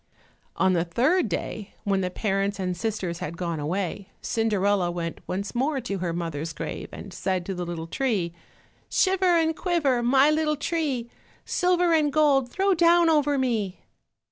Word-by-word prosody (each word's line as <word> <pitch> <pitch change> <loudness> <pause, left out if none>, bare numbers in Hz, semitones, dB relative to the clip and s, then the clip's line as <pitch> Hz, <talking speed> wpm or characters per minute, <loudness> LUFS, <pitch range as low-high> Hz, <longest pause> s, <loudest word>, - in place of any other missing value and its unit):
On 190 -1 +3
the 170 -2 +2
third 260 - +2
day, 200 +3 -4
when 195 -1 +1
the 180 - -1
parents 195 0 -1
and 180 -1 -1
sisters 185 -4 -3
had 165 +3 -5
gone 170 -3 -2
away, 185 +5 -3
Cinderella 205 -4 +1
went 170 -1 -4
once 195 +2 -3
more 270 +4 0
to 200 -6 -4
her 175 -1 -1
mother's 165 -2 -4
grave - - -5
and 195 - -9
said 185 -1 -2
to 195 - -3
the 180 -1 -4
little 165 -2 -4
tree— 190 -3 -1 0.6
"Shiver 370 -2 +3
and 320 -1 +1
quiver, 305 -10 +1
my 265 +4 +5
little 305 0 +1
tree, 285 -7 -2 0.3
Silver 360 -1 +2
and 305 -2 +3
gold 280 -4 +3
throw 390 +8 +2
down 340 -1 +5
over 295 -2 +2
me." 220 -8 -1
220 Hz, 165 wpm, -25 LUFS, 180-300 Hz, 0.6 s, my